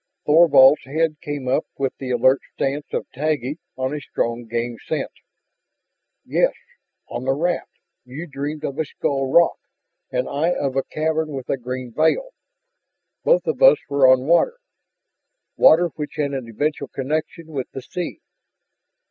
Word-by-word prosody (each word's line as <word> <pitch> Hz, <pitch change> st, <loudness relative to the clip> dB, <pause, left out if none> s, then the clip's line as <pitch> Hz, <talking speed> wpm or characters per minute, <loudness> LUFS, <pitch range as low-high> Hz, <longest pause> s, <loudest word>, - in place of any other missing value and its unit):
Thorvald's 150 Hz, -3 st, +6 dB
head 155 Hz, +3 st, 0 dB
came 145 Hz, -5 st, -5 dB
up 130 Hz, +5 st, +1 dB
with 135 Hz, -1 st, -1 dB
the 130 Hz, -, -5 dB
alert 130 Hz, +2 st, +4 dB, 0.2 s
stance 140 Hz, +2 st, -2 dB
of -, -, -2 dB
Taggi 145 Hz, +1 st, -2 dB, 0.2 s
on 130 Hz, +1 st, -2 dB
a 150 Hz, -, -4 dB
strong 120 Hz, -3 st, -3 dB
game 120 Hz, +1 st, -3 dB
scent. -, -, -3 dB, 1.1 s
"Yes, -, -, +2 dB, 0.5 s
on 120 Hz, +2 st, -5 dB
the 135 Hz, -, +2 dB
raft 175 Hz, +4 st, -1 dB, 0.3 s
you 130 Hz, +7 st, -7 dB
dreamed 145 Hz, 0 st, -5 dB
of 140 Hz, 0 st, -4 dB
a 160 Hz, -, +1 dB
skull 135 Hz, -1 st, -2 dB
rock. 170 Hz, +3 st, +4 dB, 0.5 s
And 125 Hz, 0 st, -1 dB
I 160 Hz, +5 st, 0 dB
of 135 Hz, -5 st, -2 dB
a 135 Hz, -, +2 dB
cavern 155 Hz, +1 st, -2 dB
with 130 Hz, -2 st, -6 dB
a -, -, +2 dB
green 125 Hz, -1 st, -6 dB
veil. 160 Hz, -, +2 dB, 0.9 s
Both -, -, +3 dB
of 470 Hz, -, -2 dB
us -, -, +8 dB
were 140 Hz, -2 st, +4 dB
on 130 Hz, 0 st, +3 dB
water 170 Hz, -, +3 dB, 1.0 s
water 170 Hz, +2 st, +6 dB
which 150 Hz, -2 st, -7 dB
had 145 Hz, -2 st, -1 dB
an 130 Hz, -4 st, -4 dB
eventual 145 Hz, +4 st, -2 dB
connection 155 Hz, +5 st, -4 dB
with 135 Hz, -4 st, -4 dB
the 135 Hz, -, -8 dB
sea. 175 Hz, +5 st, -5 dB
140 Hz, 155 wpm, -22 LUFS, 130-160 Hz, 1.1 s, us